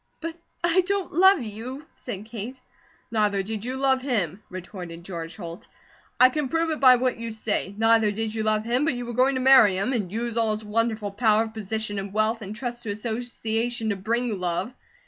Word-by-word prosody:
"But 330 Hz, 0 st, -5 dB, 0.3 s
I 345 Hz, +2 st, +4 dB
don't 400 Hz, -2 st, -1 dB
love 380 Hz, -2 st, +6 dB
you," 235 Hz, +7 st, -7 dB
said 210 Hz, -4 st, -7 dB
Kate. 230 Hz, +3 st, -7 dB, 0.5 s
"Neither 210 Hz, -3 st, +1 dB
did 215 Hz, +1 st, -5 dB
you 255 Hz, +2 st, -3 dB
love 265 Hz, -1 st, +3 dB
him," 210 Hz, -, -1 dB
retorted 180 Hz, -2 st, -8 dB
George 170 Hz, -2 st, -6 dB
Holt. 175 Hz, +1 st, -8 dB, 0.5 s
"I 255 Hz, -, +8 dB
can 295 Hz, +1 st, -2 dB
prove 330 Hz, +1 st, 0 dB
it 310 Hz, -, -2 dB
by 255 Hz, -2 st, +8 dB
what 250 Hz, -1 st, 0 dB
you 230 Hz, 0 st, -4 dB
say. 215 Hz, -3 st, -2 dB
Neither 225 Hz, -1 st, +4 dB
did 215 Hz, +1 st, -3 dB
you 220 Hz, -, -2 dB
love 215 Hz, 0 st, +1 dB
him, 245 Hz, +4 st, +1 dB
but 300 Hz, -4 st, +1 dB
you 245 Hz, 0 st, -4 dB
were 240 Hz, -, -5 dB
going 260 Hz, +3 st, +3 dB
to 260 Hz, -, -1 dB
marry 255 Hz, -8 st, +7 dB
him, 215 Hz, +8 st, 0 dB
and 205 Hz, -7 st, -2 dB
use 235 Hz, +2 st, -3 dB
all 225 Hz, -2 st, +2 dB
his 215 Hz, 0 st, -6 dB
wonderful 215 Hz, -1 st, -1 dB
power 215 Hz, +1 st, +3 dB
of 220 Hz, -1 st, -8 dB
position 220 Hz, -1 st, -3 dB
and 195 Hz, 0 st, -6 dB
wealth, 215 Hz, +2 st, +1 dB
and 210 Hz, 0 st, -6 dB
trust 240 Hz, 0 st, -5 dB
to 220 Hz, -, -6 dB
association 225 Hz, +1 st, -2 dB
to 205 Hz, -, 0 dB
BRING 225 Hz, +2 st, -1 dB
love. 180 Hz, +6 st, -2 dB
225 Hz, 205 wpm, -25 LUFS, 210-250 Hz, 0.5 s, I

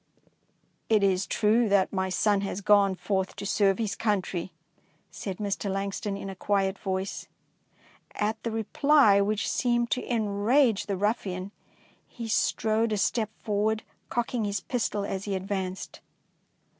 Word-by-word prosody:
''It 215 Hz, -2 st, +4 dB
is 190 Hz, 0 st, +2 dB
true 220 Hz, +1 st, +2 dB
that 200 Hz, -1 st, +3 dB
my 190 Hz, -1 st, 0 dB
son 200 Hz, +1 st, +2 dB
has 195 Hz, 0 st, -3 dB
gone 200 Hz, -2 st, +4 dB
forth 190 Hz, 0 st, -2 dB
to -, -, -6 dB
serve 195 Hz, -1 st, +2 dB
his 220 Hz, -3 st, -2 dB
country, 190 Hz, -5 st, -1 dB, 0.6 s
said 190 Hz, -3 st, -5 dB
Mr. 200 Hz, -1 st, -2 dB
Langston, 195 Hz, +1 st, -3 dB
in 195 Hz, -, -6 dB
a 195 Hz, -, -5 dB
quiet 195 Hz, 0 st, 0 dB
voice. 190 Hz, 0 st, -3 dB, 0.9 s
At 210 Hz, +1 st, -1 dB
the 230 Hz, -, -2 dB
reply, 225 Hz, 0 st, +4 dB
which 210 Hz, +1 st, 0 dB
seemed 240 Hz, -1 st, +1 dB
to 250 Hz, -, -1 dB
enrage 220 Hz, +2 st, +2 dB
the 200 Hz, -2 st, -1 dB
ruffian, 195 Hz, -2 st, -2 dB, 0.6 s
he 235 Hz, -2 st, -7 dB
strode 220 Hz, +1 st, +1 dB
a 210 Hz, -, +1 dB
step 215 Hz, +2 st, 0 dB
forward, 215 Hz, +1 st, 0 dB, 0.3 s
cocking 240 Hz, -1 st, -1 dB
his 205 Hz, -1 st, -1 dB
pistol 210 Hz, -3 st, -2 dB
as 195 Hz, 0 st, -4 dB
he 200 Hz, -2 st, -2 dB
advanced. 190 Hz, -1 st, -4 dB
205 Hz, 145 wpm, -27 LUFS, 195-220 Hz, 0.9 s, It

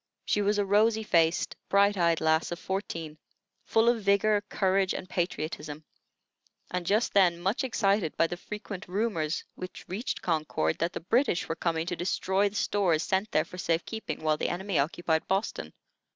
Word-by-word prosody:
She 210 Hz, -, +1 dB
was 205 Hz, +1 st, +2 dB
a 205 Hz, -, +1 dB
rosy 215 Hz, +3 st, +3 dB
faced, 165 Hz, -4 st, +2 dB
bright 200 Hz, +1 st, +4 dB
eyed 170 Hz, -3 st, +2 dB
lass 160 Hz, +1 st, +2 dB
of 175 Hz, -, -3 dB
fourteen, 165 Hz, -5 st, -4 dB, 0.5 s
full 225 Hz, +1 st, +3 dB
of 235 Hz, -2 st, +3 dB
vigor, 200 Hz, +1 st, +3 dB
courage, 190 Hz, 0 st, +1 dB
and 185 Hz, -, -5 dB
patriotism, 155 Hz, -4 st, -3 dB, 0.9 s
and 180 Hz, -1 st, -3 dB
just 215 Hz, +4 st, +2 dB
then 180 Hz, -4 st, +4 dB
much 195 Hz, +10 st, 0 dB
excited 200 Hz, -8 st, +1 dB
by -, -, +4 dB
the 170 Hz, -, -3 dB
frequent 210 Hz, +1 st, -7 dB
rumors 180 Hz, -5 st, -1 dB
which 185 Hz, 0 st, -9 dB
reached 210 Hz, +8 st, -4 dB
Concord 155 Hz, -, 0 dB
that 170 Hz, +2 st, 0 dB
the -, -, -5 dB
British 205 Hz, -, +1 dB
were 165 Hz, -, -2 dB
coming 165 Hz, -1 st, -1 dB
to 175 Hz, -, -2 dB
destroy 190 Hz, +3 st, +1 dB
the 200 Hz, -, -15 dB
stores 185 Hz, -6 st, +1 dB
sent 190 Hz, +3 st, 0 dB
there 155 Hz, -, +2 dB
for 180 Hz, -, -10 dB
safe 165 Hz, -1 st, 0 dB
keeping 220 Hz, -7 st, -5 dB
while 155 Hz, -1 st, +2 dB
the -, -, -1 dB
enemy 190 Hz, -1 st, -1 dB
occupied 160 Hz, +2 st, 0 dB
Boston. 195 Hz, +3 st, -2 dB
185 Hz, 175 wpm, -28 LUFS, 165-205 Hz, 0.9 s, bright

